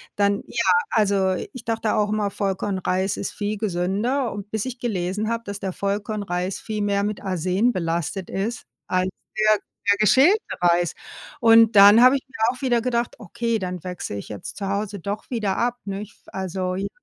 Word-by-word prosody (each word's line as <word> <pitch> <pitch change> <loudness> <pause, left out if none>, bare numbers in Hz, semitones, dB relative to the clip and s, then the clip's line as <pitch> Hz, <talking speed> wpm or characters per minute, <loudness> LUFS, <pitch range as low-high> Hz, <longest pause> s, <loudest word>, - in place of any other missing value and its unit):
Dann, 200 0 +2
ja 235 -6 +1 0.2
also, 200 -3 +2 0.2
ich 255 -3 -9
dachte 225 -1 0
auch 210 -1 +1
immer 210 -1 0
Vollkornreis 190 -1 -1
ist - - -3
viel 210 0 -3
gesünder 210 +7 -1
und 205 0 -7
bis 220 0 -2
ich 255 -1 -6
gelesen 210 -2 -2
habe, 230 0 -2
dass 200 0 -5
der 195 -2 -3
Vollkornreis 200 -2 -2
viel 215 -1 -4
mehr 200 -1 +1
mit 205 0 -3
Arsen 185 +5 +1
belastet 170 0 -2
ist 215 +5 -3 0.2
als 185 0 +1 0.3
der 215 0 +4 0.3
der 205 - +3
geschälte 265 - +5 0.2
Reis 175 -1 +3 0.5
und 225 -1 +6
dann 205 +3 +9
habe 255 +2 +7
ich 275 - -1
mir 265 - -12 0.2
auch - - -14
wieder 245 -3 +2
gedacht, 240 -1 -1
okay, 230 +5 -2
dann 180 -4 -5
wechsle 180 - -5
ich 100 - -8
jetzt 105 -2 -7
zu 200 - -3
Hause 200 +1 -2
doch 200 +4 -5
wieder 210 -6 -1
ab, 245 +1 0
nicht? 200 +1 -6
Also, 185 -1 -3
j 195 +2 -2
205 Hz, 180 wpm, -23 LUFS, 190-225 Hz, 0.5 s, dann